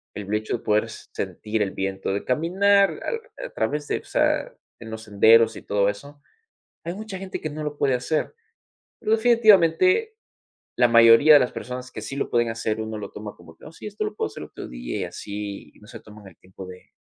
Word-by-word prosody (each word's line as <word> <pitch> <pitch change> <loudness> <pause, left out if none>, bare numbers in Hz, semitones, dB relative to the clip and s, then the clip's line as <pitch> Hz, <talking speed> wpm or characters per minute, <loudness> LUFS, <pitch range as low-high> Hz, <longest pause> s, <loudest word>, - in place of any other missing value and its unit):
el 105 0 -5
hecho 110 +2 -1
de - - -19
poder 105 +1 +1
sentir 110 0 -5
el 100 -2 0
viento, 95 0 -3
de 100 - -3
caminar 195 +8 +2
al 455 -1 -3 0.2
a - - -7
través 150 0 -2
de, - - -1
o - - -18
sea, - - 0 0.3
en 115 -1 -10
los 110 0 -7
senderos 110 +2 +5
y - - -9
todo 100 -1 0
eso, 145 +8 -9 0.6
hay 170 - -4
mucha 210 -2 -7
gente 195 -1 -6
que 155 - -3
no 155 +1 -6
lo 150 -1 -5
puede 135 -2 +1
hacer. 150 +5 -2 0.7
Pero, 215 - -1
definitivamente, 235 - +4 0.6
la 120 0 +5
mayoría 115 +6 +7
de 145 - +9
las 125 -2 0
personas 125 0 -7
que 110 - -7
sí 135 - -6
lo 140 - -2
pueden 120 -1 +1
hacer, 110 -1 -3
uno 110 0 -5
lo 100 -2 -7
toma 105 0 -8
como 80 -2 -16
que: - - -17
"Oh, - - -10
sí, - - -12
esto 210 +1 -4
lo 210 - -5
puedo - - -2
hacer 110 - -9
otro - - -9
día", - - -5
y - - -1
así, 100 -1 -7
y - - -21
no 105 - -17
se 115 -2 -10
toman 105 -2 -15
el 90 - -16
tiempo 95 +1 -12
de 90 0 -13
115 Hz, 220 wpm, -24 LUFS, 105-165 Hz, 0.7 s, de